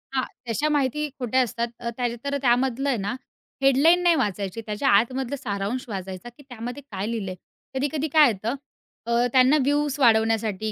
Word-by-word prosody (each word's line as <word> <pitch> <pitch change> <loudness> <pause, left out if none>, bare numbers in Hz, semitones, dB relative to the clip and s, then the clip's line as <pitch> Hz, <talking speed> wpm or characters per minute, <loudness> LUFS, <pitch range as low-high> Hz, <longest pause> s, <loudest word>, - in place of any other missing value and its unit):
हां, 260 - +2 0.3
तशा 290 +7 0
माहिती 295 +1 0
खोट्या 255 +1 +1
असतात. 235 -1 -1
अ, 235 - -3
त्या 245 -1 0 0.2
तर 280 0 0
त्यामधलं 260 +1 +1
आहे 260 - +1
ना 205 +3 -3 0.5
हेडलाईन 280 +6 +5
नाही 345 -1 +5
वाचायची, 205 - -2
त्याच्या 210 +6 -1
आतमधलं 250 +6 +2
सारांश 235 0 -3
वाचायचा, 190 +1 -6
की 240 +4 -18
त्यामध्ये 245 +3 -6
काय 195 +1 -3
लिहिलंय. 195 -5 -4 0.4
कधी-कधी 285 +3 -1
काय 305 -2 +7
येतं 220 +5 -3 0.5
अ, 235 - -3 0.2
त्यांना 260 +3 +5
व्ह्यूज 290 0 +1
वाढवण्यासाठी 220 -3 +2
245 Hz, 160 wpm, -24 LUFS, 220-280 Hz, 0.5 s, काय